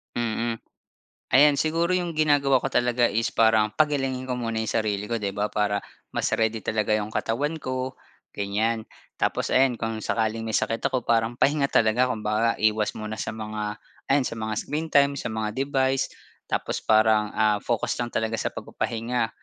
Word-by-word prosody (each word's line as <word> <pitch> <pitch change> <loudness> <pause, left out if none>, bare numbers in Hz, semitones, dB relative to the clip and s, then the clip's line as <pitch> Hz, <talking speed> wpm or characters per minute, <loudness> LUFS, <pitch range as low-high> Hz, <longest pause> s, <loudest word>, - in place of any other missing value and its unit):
Mm, 115 0 -1 0.7
ayan 145 +1 +6
siguro 165 +3 +1
yung 175 -3 -1
ginagawa 145 -3 +4
ko 135 +1 -3
talaga 120 0 +3
is 115 +1 0
parang 110 -1 +3
pagalingin 135 -4 +1
ko 130 - -2
muna 115 -2 -3
yung 110 - -1 0.2
sarili 105 -1 -2
ko, 115 0 -3
'di 100 - -1
ba? 105 +1 -1
Para 105 -1 0 0.3
mas - - -2
ready 110 0 +1
talaga 110 -1 0
yung 105 +1 -4
katawan 145 +7 -1
ko 130 0 -3 0.4
ganyan. 110 +3 -1 0.4
Tapos - - 0
ayan, 130 -2 +4
kung 115 -1 -3
sakaling 110 0 -1
may 110 - +1
sakit 115 - -1
ako 130 -2 -2
parang 115 +1 +1
pahinga 140 -1 +2
talaga 115 +3 +3
kumbaga, 110 0 0
iwas 110 0 +1
muna 110 0 -5
sa 110 - -4
mga 105 -1 -4 0.3
ayan 135 -1 +3
sa - - -3
mga 110 0 -3
screen 155 +7 -3
time, 140 -1 +4
sa 140 - -4
mga 110 -1 -3
device. 135 0 0 0.4
Tapos - - -2
parang, 110 -1 +3
ah, 105 -1 +3
focus 120 -3 -1
lang 120 - -2
talaga 110 -1 -1
sa - - -1
pagpapahinga, 115 0 -2
115 Hz, 175 wpm, -25 LUFS, 110-130 Hz, 0.7 s, ayan